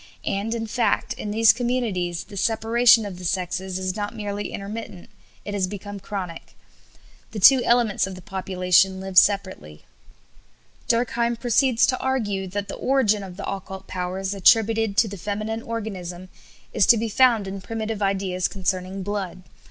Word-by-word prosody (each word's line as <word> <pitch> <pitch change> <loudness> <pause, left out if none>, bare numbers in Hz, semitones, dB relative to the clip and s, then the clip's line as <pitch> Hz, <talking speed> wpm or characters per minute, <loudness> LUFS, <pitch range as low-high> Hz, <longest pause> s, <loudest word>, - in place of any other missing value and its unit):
And, 210 +4 -2
in 225 -1 -3
fact, 235 +2 0
in 210 - -6
these 220 0 +5
communities, 225 -8 -2
the 205 - -13
separation 225 +2 +4
of 185 -3 -7
the - - -10
sexes 185 +1 -2
is 185 0 -3
not 210 +1 -4
merely 205 -1 -4
intermittent; 200 -2 -7 0.3
it 205 - -5
has 195 -2 0
become 205 +1 -7
chronic. 185 -4 -7 0.8
The 215 - -4
two 260 +5 +7
elements 235 -5 +2
of 190 - -7
the 185 - -11
population 190 -1 +1
live 190 0 -7
separately." 185 - +2 1.0
Durkheim 235 0 +1
proceeds 240 +1 +2
to 255 - 0
argue 210 -8 -1
that 200 +2 -4
the - - -6
origin 240 -6 +1
of 190 -2 -9
the 200 - -6
occult 190 0 -6
powers 185 +2 -3
attributed 220 +1 +3
to 225 - +4
the 200 -1 -7
feminine 215 +4 -4
organism 185 -6 -6 0.4
is 195 - +3
to 235 - +7
be 230 +1 -1
found 230 -1 +3
in 195 0 -6
primitive 220 0 -4
ideas 190 -2 0
concerning 185 0 -3
blood. 190 -2 -4
200 Hz, 160 wpm, -23 LUFS, 190-225 Hz, 1.0 s, two